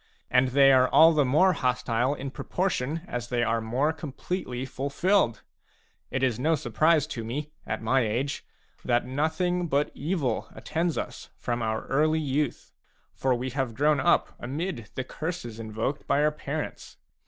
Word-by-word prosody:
And 125 Hz, +1 st, +4 dB
they 135 Hz, +1 st, +6 dB
are 130 Hz, -1 st, +5 dB
all 165 Hz, +1 st, +7 dB
the 150 Hz, -2 st, +3 dB
more 155 Hz, +9 st, +4 dB
hostile 125 Hz, -1 st, 0 dB
in 135 Hz, -1 st, -6 dB
proportion 165 Hz, -3 st, -2 dB
as 120 Hz, -1 st, -4 dB
they 120 Hz, -1 st, +1 dB
are 115 Hz, 0 st, +1 dB
more 130 Hz, +8 st, 0 dB
completely 145 Hz, -3 st, -4 dB
fulfilled. 140 Hz, -, +1 dB, 0.7 s
It 130 Hz, -, -2 dB
is 125 Hz, -3 st, +1 dB
no 160 Hz, +5 st, +3 dB
surprise 155 Hz, +4 st, +2 dB
to 125 Hz, -7 st, -5 dB
me, 145 Hz, +7 st, -4 dB, 0.2 s
at 110 Hz, +1 st, -3 dB
my 130 Hz, +4 st, +3 dB
age, 120 Hz, +5 st, -1 dB, 0.4 s
that 120 Hz, -1 st, +1 dB
nothing 160 Hz, +6 st, 0 dB
but 145 Hz, -1 st, +1 dB
evil 150 Hz, -3 st, -1 dB
attends 165 Hz, 0 st, -1 dB
us -, -, -5 dB
from 120 Hz, 0 st, -2 dB
our 110 Hz, 0 st, -2 dB
early 155 Hz, +3 st, +2 dB
youth; 145 Hz, -2 st, -2 dB, 0.4 s
for 130 Hz, -1 st, +1 dB
we 125 Hz, +2 st, -3 dB
have 130 Hz, -3 st, -2 dB
grown 150 Hz, +2 st, +3 dB
up 130 Hz, -, +2 dB
amid 135 Hz, -, -4 dB
the 130 Hz, -, -2 dB
curses 155 Hz, -6 st, -5 dB
invoked 110 Hz, +6 st, -3 dB
by 145 Hz, -, +3 dB
oiir 150 Hz, 0 st, +2 dB
parents. 150 Hz, +1 st, -5 dB
135 Hz, 160 wpm, -27 LUFS, 120-155 Hz, 0.7 s, all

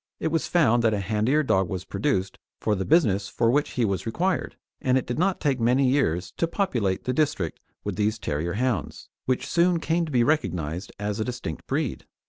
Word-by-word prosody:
It -, -, 0 dB
was 160 Hz, 0 st, 0 dB
found 120 Hz, -9 st, +3 dB
that 110 Hz, -2 st, +3 dB
a -, -, -1 dB
handier 110 Hz, +9 st, +1 dB
dog 95 Hz, -, +2 dB
was 95 Hz, -1 st, -4 dB
produced 95 Hz, -1 st, -1 dB, 0.2 s
for 110 Hz, -, +1 dB
the 95 Hz, -2 st, -1 dB
business 105 Hz, -, +3 dB
for 115 Hz, +3 st, +1 dB
which 145 Hz, +3 st, +1 dB
he 120 Hz, -, +1 dB
was 100 Hz, +2 st, -2 dB
required, 180 Hz, +11 st, -1 dB, 0.3 s
and 130 Hz, 0 st, +3 dB
it 130 Hz, -, -1 dB
did 120 Hz, -, -3 dB
not 190 Hz, +1 st, +1 dB
take 135 Hz, -3 st, 0 dB
many 125 Hz, +3 st, +3 dB
years 90 Hz, -, +1 dB
to 165 Hz, -, +1 dB
populate 120 Hz, -, -1 dB
the 125 Hz, -, -1 dB
district 140 Hz, -, 0 dB, 0.2 s
with -, -, -4 dB
these 105 Hz, +1 st, +1 dB
terrier 80 Hz, -3 st, -2 dB
hounds, 120 Hz, -, -2 dB, 0.2 s
which 130 Hz, -1 st, 0 dB
soon 170 Hz, 0 st, +2 dB
came 165 Hz, +1 st, 0 dB
to -, -, -6 dB
be 120 Hz, -3 st, +3 dB
recognised 90 Hz, -, -1 dB
as 105 Hz, 0 st, -3 dB
a -, -, +1 dB
distinct 125 Hz, -11 st, -5 dB
breed. -, -, -2 dB
120 Hz, 205 wpm, -25 LUFS, 100-145 Hz, 0.3 s, found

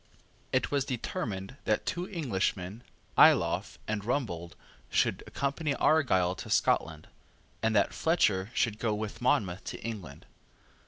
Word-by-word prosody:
It 130 Hz, -2 st, +1 dB
was 140 Hz, -2 st, +2 dB
determined 115 Hz, -3 st, -4 dB
that 105 Hz, -, +1 dB
two 180 Hz, +3 st, -3 dB
Englishmen, 105 Hz, -, -2 dB, 0.4 s
Ayloffe -, -, +5 dB
and 110 Hz, -2 st, -2 dB
Rumbold, 95 Hz, -, -2 dB, 0.4 s
should -, -, +1 dB
accompany 140 Hz, +1 st, -1 dB
Argyle 95 Hz, -, +3 dB
to -, -, -7 dB
Scotland, 80 Hz, -2 st, +1 dB, 0.5 s
and 110 Hz, -1 st, +1 dB
that 100 Hz, -, +3 dB
Fletcher 105 Hz, -, +2 dB
should 110 Hz, -3 st, +1 dB
go 110 Hz, -3 st, 0 dB
with 110 Hz, +2 st, -5 dB
Monmouth 100 Hz, -7 st, +1 dB
to -, -, -5 dB
England. 95 Hz, -11 st, -7 dB
110 Hz, 125 wpm, -30 LUFS, 95-130 Hz, 0.5 s, Ayloffe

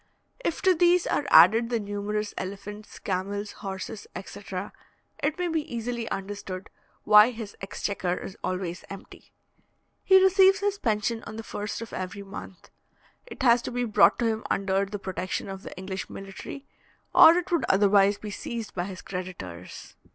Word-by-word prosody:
If 335 Hz, -, -2 dB
to 375 Hz, -1 st, +6 dB
these 350 Hz, +1 st, +4 dB
are 285 Hz, -, 0 dB
added 230 Hz, +2 st, +7 dB
the 235 Hz, -2 st, 0 dB
numerous 205 Hz, 0 st, -3 dB
elephants, 200 Hz, +2 st, -7 dB
camels, 200 Hz, +2 st, -3 dB
horses, 195 Hz, +2 st, -6 dB
etc., 190 Hz, 0 st, -6 dB, 0.5 s
it 295 Hz, +1 st, 0 dB
may 360 Hz, -1 st, -1 dB
be 325 Hz, -2 st, 0 dB
easily 235 Hz, 0 st, -3 dB
understood 195 Hz, -1 st, -6 dB, 0.3 s
why 210 Hz, +2 st, +8 dB
his 225 Hz, -4 st, -7 dB
exchequer 195 Hz, -2 st, -2 dB
is 190 Hz, -, -7 dB
always 180 Hz, -1 st, -3 dB
empty. 195 Hz, -, -11 dB, 0.7 s
He 380 Hz, 0 st, +7 dB
receives 380 Hz, +1 st, +6 dB
his 405 Hz, 0 st, -1 dB
pension 225 Hz, -, 0 dB
on -, -, -8 dB
the 225 Hz, -, -6 dB
first 210 Hz, +1 st, -5 dB
of 225 Hz, -, -11 dB
every 185 Hz, +2 st, -5 dB
month. 195 Hz, -2 st, -10 dB, 0.6 s
It 365 Hz, -, -7 dB
has 240 Hz, -1 st, +5 dB
to -, -, -5 dB
be 245 Hz, 0 st, -1 dB
brought 220 Hz, -4 st, +5 dB
to 235 Hz, -, 0 dB
him 220 Hz, -1 st, 0 dB
under 195 Hz, 0 st, +1 dB
the 205 Hz, +1 st, -5 dB
protection 190 Hz, -1 st, -4 dB
of 195 Hz, -1 st, -7 dB
the -, -, -10 dB
English 190 Hz, 0 st, -5 dB
military, 195 Hz, +8 st, -8 dB, 0.5 s
or 325 Hz, -, +9 dB
it 355 Hz, 0 st, -2 dB
would 340 Hz, -, +2 dB
otherwise 200 Hz, 0 st, +4 dB
be 210 Hz, 0 st, -7 dB
seized 225 Hz, +1 st, -5 dB
by 175 Hz, -1 st, -2 dB
his 185 Hz, -1 st, -8 dB
creditors. 175 Hz, -, -7 dB
205 Hz, 165 wpm, -27 LUFS, 195-235 Hz, 0.7 s, or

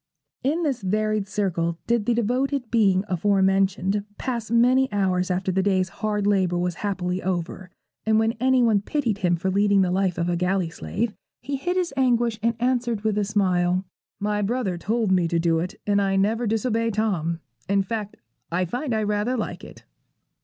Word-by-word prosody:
In 310 Hz, +6 st, +1 dB
this 270 Hz, -6 st, -1 dB
varied 215 Hz, +1 st, 0 dB
circle 175 Hz, -5 st, -1 dB
did 235 Hz, -3 st, 0 dB
the 240 Hz, -, +3 dB
devoted 250 Hz, +2 st, -1 dB
being 195 Hz, -5 st, +3 dB
afore 190 Hz, +2 st, +2 dB
mentioned 195 Hz, +1 st, +1 dB
pass 235 Hz, -3 st, -3 dB
many 250 Hz, +3 st, +3 dB
hours 185 Hz, -2 st, +1 dB
after 185 Hz, +1 st, 0 dB
the 190 Hz, +1 st, +1 dB
day's 190 Hz, -2 st, +1 dB
hard 210 Hz, -2 st, 0 dB
labour 190 Hz, -4 st, +2 dB
was 180 Hz, 0 st, 0 dB
happily 185 Hz, -2 st, -2 dB
over, 180 Hz, 0 st, -3 dB, 0.3 s
and 220 Hz, 0 st, +2 dB
when 225 Hz, +1 st, +3 dB
anyone 245 Hz, -5 st, +3 dB
pitied 230 Hz, -3 st, -1 dB
him 175 Hz, -3 st, +2 dB
for 190 Hz, +3 st, -2 dB
leading 200 Hz, 0 st, +3 dB
the 180 Hz, -, 0 dB
life 185 Hz, -1 st, 0 dB
of 170 Hz, 0 st, 0 dB
a 175 Hz, -, +1 dB
galley 180 Hz, -1 st, 0 dB
slave, 215 Hz, +5 st, -3 dB, 0.3 s
he 280 Hz, -, -3 dB
hid 355 Hz, +7 st, -2 dB
his 355 Hz, -5 st, -1 dB
anguish 240 Hz, -4 st, +2 dB
and 230 Hz, +1 st, +1 dB
answered 240 Hz, -3 st, 0 dB
with 215 Hz, -1 st, 0 dB
a 210 Hz, -, +1 dB
smile, 185 Hz, -3 st, +1 dB, 0.3 s
'My 210 Hz, +1 st, -1 dB
brother 210 Hz, -3 st, -1 dB
told 215 Hz, +3 st, -1 dB
me 180 Hz, -2 st, +3 dB
to 170 Hz, 0 st, 0 dB
do 165 Hz, -1 st, +2 dB
it, 180 Hz, +4 st, -5 dB
and 205 Hz, -1 st, +2 dB
I 195 Hz, -1 st, +1 dB
never 220 Hz, +4 st, +1 dB
disobey 225 Hz, +1 st, 0 dB
Tom. 190 Hz, -7 st, -1 dB, 0.3 s
In 200 Hz, 0 st, +3 dB
fact, 210 Hz, 0 st, -5 dB, 0.3 s
I 180 Hz, +2 st, +1 dB
find 245 Hz, -, -2 dB
I 215 Hz, -, 0 dB
rather 210 Hz, +4 st, 0 dB
like 220 Hz, -, -4 dB
it.' -, -, -12 dB
205 Hz, 185 wpm, -24 LUFS, 185-230 Hz, 0.3 s, the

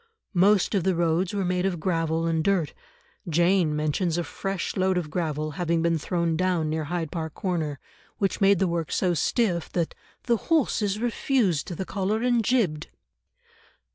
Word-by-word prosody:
Most 195 Hz, +2 st, +4 dB
of 195 Hz, -4 st, +1 dB
the 190 Hz, 0 st, +1 dB
roads 170 Hz, +2 st, +1 dB
were 200 Hz, -2 st, -1 dB
made 180 Hz, 0 st, 0 dB
of 185 Hz, -3 st, -1 dB
gravel 165 Hz, -1 st, 0 dB
and 165 Hz, -1 st, +1 dB
dirt; 185 Hz, -5 st, +1 dB, 0.6 s
Jane 170 Hz, -1 st, +3 dB
mentions 155 Hz, +3 st, 0 dB
a 175 Hz, -, 0 dB
fresh 195 Hz, +4 st, -4 dB
load 185 Hz, -1 st, +1 dB
of 160 Hz, -4 st, -3 dB
gravel 155 Hz, -3 st, -2 dB
having 170 Hz, -1 st, +1 dB
been 165 Hz, -1 st, +2 dB
thrown 170 Hz, +1 st, -1 dB
down 175 Hz, -3 st, 0 dB
near 155 Hz, -1 st, -2 dB
Hyde 165 Hz, -1 st, -3 dB
Park 160 Hz, -2 st, -4 dB
Corner, 160 Hz, -8 st, -2 dB, 0.4 s
which 195 Hz, 0 st, -1 dB
made 195 Hz, 0 st, +5 dB
the 190 Hz, -, +1 dB
work 170 Hz, -2 st, -2 dB
so 180 Hz, -2 st, +1 dB
stiff 175 Hz, -1 st, 0 dB
that 170 Hz, -2 st, -1 dB, 0.3 s
"the 235 Hz, -2 st, +2 dB
horses 220 Hz, -9 st, +1 dB
refused 230 Hz, -, 0 dB
the 190 Hz, -, -3 dB
collar 205 Hz, +4 st, -1 dB
and 240 Hz, -2 st, +2 dB
jibbed." 195 Hz, -11 st, +1 dB
175 Hz, 170 wpm, -26 LUFS, 165-195 Hz, 0.6 s, made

